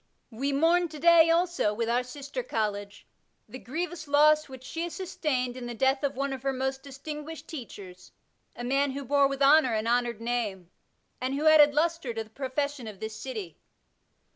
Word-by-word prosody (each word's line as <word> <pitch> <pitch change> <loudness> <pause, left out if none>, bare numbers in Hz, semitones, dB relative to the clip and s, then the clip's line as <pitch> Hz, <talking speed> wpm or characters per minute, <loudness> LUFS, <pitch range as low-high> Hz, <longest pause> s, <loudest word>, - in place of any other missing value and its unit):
We 270 +5 -2
mourn 335 +5 +3
to 310 -1 -10
day, 335 +1 +6
also, 335 -10 +1
with 230 +1 -1
our 240 +2 +2
sister 280 - -6
college, 205 - -3 0.4
the 260 - -9
grievous 330 +4 -5
loss 305 +1 +4
which 260 -1 -10
she 325 +5 -5
has 345 - -7
sustained 290 -10 -2
in 250 -1 -6
the 240 - -6
death 265 +3 +2
of 280 -1 -1
one 275 +1 -2
of 265 - -6
her 270 +1 0
most 265 +1 -2
distinguished 300 +3 -8
teachers, 195 - -10 0.4
a 240 - -7
man 275 +2 +1
who 280 0 -5
bore 280 +1 +4
with 275 0 -2
honour 280 -4 +5
an 215 0 -1
honoured 240 -1 0
name, 220 -7 -3 0.5
and 260 +2 -1
who 295 +3 -2
added 300 -2 +7
lustre 320 -6 0
to 225 - -2
the 215 - -21
profession 270 0 -3
of 205 -3 -9
this 220 0 -5
city. 215 - -7
270 Hz, 190 wpm, -28 LUFS, 240-305 Hz, 0.5 s, added